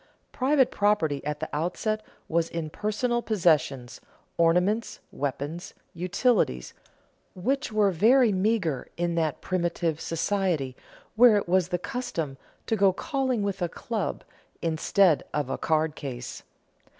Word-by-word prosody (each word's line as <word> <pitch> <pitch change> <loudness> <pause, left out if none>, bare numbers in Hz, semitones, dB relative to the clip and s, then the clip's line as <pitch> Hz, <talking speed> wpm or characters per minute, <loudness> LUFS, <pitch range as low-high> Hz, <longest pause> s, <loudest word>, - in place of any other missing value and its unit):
Private 265 0 +2
property 200 -9 +1
at 150 0 -4
the 160 - -3
outset 180 +8 -1 0.3
was 165 0 0
in 160 -2 -4
personal 240 +5 -1
possessions, 150 - +1 0.3
ornaments, 180 +7 +2
weapons, 145 +5 -4 0.2
utensils, 180 - 0 0.6
which 255 +8 -1
were 210 -2 +3
very 230 +7 +5
meager 185 - 0
in 175 0 0
that 160 -3 -1
primitive 170 -3 -1
society 165 -6 -1 0.4
where 230 -1 +7
it 200 - -2
was 185 -1 +2
the 180 - -1
custom 170 - -4 0.3
"to 225 - 0
go 195 -2 +4
calling 260 +2 -1
with 200 -2 -2
a 175 - 0
club 215 +3 -4 0.4
instead 165 +1 +3
of 145 -3 -1
a - - -2
card 155 -1 +1
case." 125 -4 -6
180 Hz, 125 wpm, -27 LUFS, 155-215 Hz, 0.6 s, where